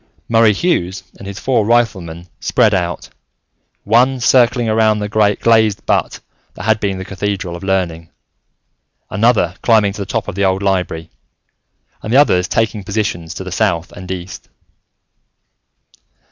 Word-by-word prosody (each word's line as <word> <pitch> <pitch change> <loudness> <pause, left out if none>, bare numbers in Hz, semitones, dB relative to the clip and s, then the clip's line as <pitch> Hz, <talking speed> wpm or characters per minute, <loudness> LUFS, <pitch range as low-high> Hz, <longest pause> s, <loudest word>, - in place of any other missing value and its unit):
Murray 115 -1 +4
Hughes 95 - -1 0.2
and 100 - -9
his 100 -1 -7
four 120 -2 +1
riflemen 95 -7 0
spread 110 - +2
out, 90 -3 -2 0.7
one 125 +5 +3
circling 120 -1 +3
around 110 -1 +2
the 105 0 -3
glazed 110 0 +2
butte - - 0 0.3
that - - -8
had 110 +2 +2
been 100 -2 -2
the 95 - -6
Cathedral 100 -2 -3
of 85 - -9
Learning, 90 -4 -2 1.0
another 105 -4 +2
climbing 110 -4 +3
to 105 - -7
the 100 - -5
top 110 -1 -2
of - - -4
the 100 +2 -1
old 95 +1 +1
Library, 90 -4 -1 0.9
and 110 - -5
the 130 - +4
others 90 -11 +4
taking 110 -2 -1
positions 95 -5 -3
to - - -6
the 95 - -7
south 90 -4 0
and 90 0 -10
east. 95 0 -7
100 Hz, 145 wpm, -16 LUFS, 90-110 Hz, 1.0 s, Murray